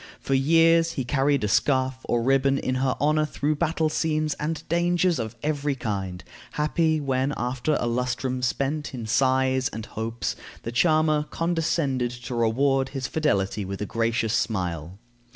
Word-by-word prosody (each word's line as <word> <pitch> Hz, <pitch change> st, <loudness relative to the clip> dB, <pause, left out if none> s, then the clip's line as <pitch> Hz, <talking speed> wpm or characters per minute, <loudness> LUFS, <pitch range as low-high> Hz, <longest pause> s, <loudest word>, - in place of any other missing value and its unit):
For 135 Hz, -, -2 dB
years 165 Hz, +4 st, +4 dB
he 135 Hz, -, -2 dB
carried 140 Hz, 0 st, +1 dB
a -, -, +1 dB
scarf 130 Hz, +5 st, +2 dB
or 120 Hz, -, +1 dB
a -, -, -3 dB
ribbon 135 Hz, +1 st, +3 dB
in 130 Hz, -, -1 dB
her 130 Hz, -1 st, +1 dB
honor 155 Hz, +2 st, +2 dB
through 150 Hz, 0 st, -1 dB
battle 160 Hz, 0 st, +1 dB
scenes 155 Hz, -1 st, 0 dB
and 155 Hz, +1 st, -3 dB
dangers 175 Hz, 0 st, +2 dB
of 110 Hz, 0 st, -4 dB
every 145 Hz, -2 st, 0 dB
kind, 95 Hz, -7 st, -4 dB, 0.3 s
happy 155 Hz, +1 st, +1 dB
when, 135 Hz, 0 st, 0 dB
after 125 Hz, +5 st, -1 dB
a -, -, -1 dB
lustrum 125 Hz, +1 st, -1 dB
spent 140 Hz, +3 st, -1 dB
in 120 Hz, -3 st, -5 dB
sighs 130 Hz, +2 st, +2 dB
and 110 Hz, -1 st, -6 dB
hopes, 115 Hz, +1 st, -4 dB, 0.3 s
the 115 Hz, -, -4 dB
charmer 155 Hz, +2 st, +2 dB
condescended 165 Hz, -7 st, 0 dB
to 120 Hz, +1 st, -7 dB
reward 130 Hz, +4 st, +2 dB
his 135 Hz, -2 st, -4 dB
fidelity 105 Hz, -9 st, 0 dB
with 95 Hz, 0 st, -5 dB
a 105 Hz, -, -2 dB
gracious 115 Hz, +1 st, 0 dB
smile. 90 Hz, -7 st, -2 dB
135 Hz, 160 wpm, -25 LUFS, 120-155 Hz, 0.3 s, years